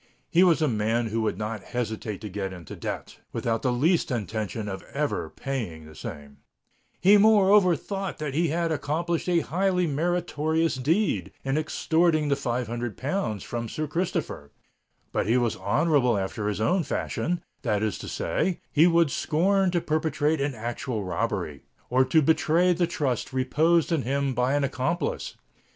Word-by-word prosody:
He 175 Hz, +1 st, +5 dB
was 170 Hz, -3 st, +4 dB
a -, -, +3 dB
man 115 Hz, 0 st, 0 dB
who 115 Hz, +1 st, -1 dB
would 110 Hz, -5 st, -1 dB
not 110 Hz, 0 st, -4 dB
hesitate 110 Hz, -3 st, -4 dB
to 105 Hz, -, -5 dB
get 95 Hz, -1 st, -4 dB
into 85 Hz, -4 st, -9 dB
debt, -, -, -6 dB
without 115 Hz, -1 st, -1 dB
the 125 Hz, -, +1 dB
least 160 Hz, +8 st, +2 dB
intention 110 Hz, -2 st, -3 dB
of 95 Hz, -1 st, -5 dB
ever 145 Hz, +1 st, -2 dB
paying 110 Hz, -, -5 dB
the 80 Hz, -, -13 dB
same,—he 75 Hz, -, -2 dB
moreover 200 Hz, -3 st, +5 dB
thought 195 Hz, +3 st, -4 dB
that 150 Hz, -3 st, -4 dB
he 165 Hz, +4 st, +2 dB
had 165 Hz, +2 st, 0 dB
accomplished 165 Hz, +4 st, -1 dB
a 170 Hz, -2 st, +3 dB
highly 180 Hz, +4 st, +1 dB
meritorious 165 Hz, 0 st, 0 dB
deed 140 Hz, -, 0 dB
in 135 Hz, 0 st, -1 dB
extorting 155 Hz, 0 st, +1 dB
the 140 Hz, -, +3 dB
five 125 Hz, -3 st, -2 dB
hundred 120 Hz, 0 st, -4 dB
pounds 135 Hz, -, -2 dB
from 115 Hz, -1 st, -4 dB
Sir 155 Hz, -, -3 dB
Christopher: 150 Hz, -, -3 dB, 0.6 s
but -, -, -1 dB
he 115 Hz, +3 st, +3 dB
was 120 Hz, -3 st, +1 dB
honourable 130 Hz, 0 st, +2 dB
after 100 Hz, +2 st, -3 dB
his 105 Hz, -1 st, -2 dB
own 180 Hz, -, +2 dB
fashion—that 155 Hz, -10 st, -2 dB
is 110 Hz, -3 st, -1 dB
to -, -, -7 dB
say, 185 Hz, -2 st, -1 dB
he 155 Hz, +3 st, +5 dB
would 170 Hz, -4 st, +3 dB
scorn 185 Hz, +5 st, +2 dB
to 175 Hz, -1 st, +1 dB
perpetrate 155 Hz, -1 st, 0 dB
an 140 Hz, -2 st, -1 dB
actual 115 Hz, 0 st, -3 dB
robbery, 90 Hz, -3 st, -2 dB, 0.3 s
or 130 Hz, +1 st, +5 dB
to 150 Hz, +4 st, +3 dB
betray 165 Hz, +4 st, +3 dB
the 175 Hz, 0 st, +1 dB
trust 135 Hz, -7 st, -2 dB
reposed 155 Hz, +6 st, +2 dB
in 165 Hz, -4 st, +2 dB
him 135 Hz, +2 st, 0 dB
by 125 Hz, +3 st, +1 dB
an 145 Hz, -, +1 dB
accomplice. 140 Hz, +4 st, -2 dB
145 Hz, 165 wpm, -26 LUFS, 115-170 Hz, 0.6 s, He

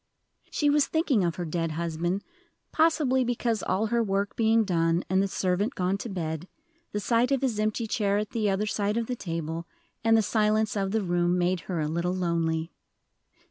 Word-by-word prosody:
She 295 Hz, -, 0 dB
was 290 Hz, 0 st, +4 dB
thinking 295 Hz, -, +1 dB
of 170 Hz, -1 st, 0 dB
her 175 Hz, -, -4 dB
dead 165 Hz, 0 st, -2 dB
husband, 170 Hz, +3 st, -2 dB, 0.5 s
possibly 300 Hz, -5 st, +3 dB
because 235 Hz, -3 st, -1 dB
all 195 Hz, +4 st, 0 dB
her 235 Hz, -, +3 dB
work 200 Hz, -1 st, -1 dB
being 225 Hz, 0 st, +3 dB
done, 170 Hz, -3 st, +1 dB
and 190 Hz, 0 st, +4 dB
the 195 Hz, -, +1 dB
servant 190 Hz, +5 st, -1 dB
gone 185 Hz, +2 st, 0 dB
to 230 Hz, -, -5 dB
bed, 165 Hz, -3 st, -4 dB, 0.4 s
the 210 Hz, -, -2 dB
sight 235 Hz, +4 st, +2 dB
of 275 Hz, -1 st, +1 dB
his 235 Hz, -5 st, 0 dB
empty 215 Hz, +2 st, 0 dB
chair 205 Hz, -2 st, +1 dB
at 210 Hz, 0 st, -2 dB
the 215 Hz, -3 st, 0 dB
other 195 Hz, +2 st, 0 dB
side 210 Hz, +1 st, -1 dB
of 235 Hz, -, 0 dB
the 250 Hz, -, -3 dB
table, 165 Hz, -4 st, -4 dB, 0.4 s
and 225 Hz, 0 st, +5 dB
the 220 Hz, -, +3 dB
silence 215 Hz, 0 st, +1 dB
of 195 Hz, -1 st, 0 dB
the 215 Hz, +1 st, 0 dB
room, 175 Hz, 0 st, +1 dB
made 180 Hz, +1 st, +1 dB
her 175 Hz, -3 st, -1 dB
a 150 Hz, -, 0 dB
little 170 Hz, +3 st, -1 dB
lonely. 165 Hz, -2 st, -1 dB
200 Hz, 195 wpm, -27 LUFS, 175-225 Hz, 0.5 s, and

